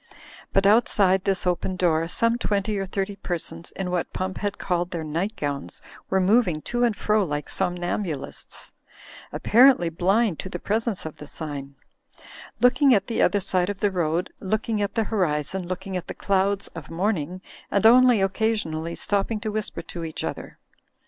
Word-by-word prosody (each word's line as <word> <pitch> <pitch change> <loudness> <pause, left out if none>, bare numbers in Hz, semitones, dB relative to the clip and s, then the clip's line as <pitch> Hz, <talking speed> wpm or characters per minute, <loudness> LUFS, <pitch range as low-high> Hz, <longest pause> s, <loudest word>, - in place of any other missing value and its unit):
But 195 0 +2
outside 200 -3 +4
this 195 -1 0
open 180 +1 0
door, 165 -3 +1
some 230 +6 +1
twenty 205 -2 0
or 195 - -3
thirty 195 +1 -3
persons 170 -2 -4
in 185 -2 -3
what 180 -2 -1
Pump 185 0 -3
had 205 -1 -2
called 175 -1 -1
their 170 -3 -4
night 170 +8 -2
gowns 140 -4 -4 0.3
were 190 - +2
moving 190 -4 +3
to 240 0 +2
and 235 -3 +2
fro 215 0 +2
like 150 -4 -4
somnambulists, 175 -4 -3 0.6
apparently 240 -6 +5
blind 190 +3 +1
to 190 - -5
the - - -4
presence 220 -3 -2
of 160 - -7
the 150 - -10
sign; 140 -3 -6 0.8
looking 255 +1 +5
at 200 - +1
the 230 - -1
other 205 - +3
side 185 -1 +1
of 200 -1 -4
the 205 -1 +1
road, 170 -1 -1
looking 215 +2 -1
at 200 +1 -2
the 225 - +2
horizon, 180 -3 -1
looking 185 +1 -5
at 180 - -4
the - - -6
clouds 200 0 0
of - - -10
morning; 180 -1 -1 0.3
and 200 +1 +1
only 245 -1 +7
occasionally 190 -6 -1
stopping 205 +2 0
to 215 -1 -3
whisper 215 0 -3
to 170 - -7
each 160 -1 -5
other. - - -6
190 Hz, 170 wpm, -24 LUFS, 175-210 Hz, 0.8 s, only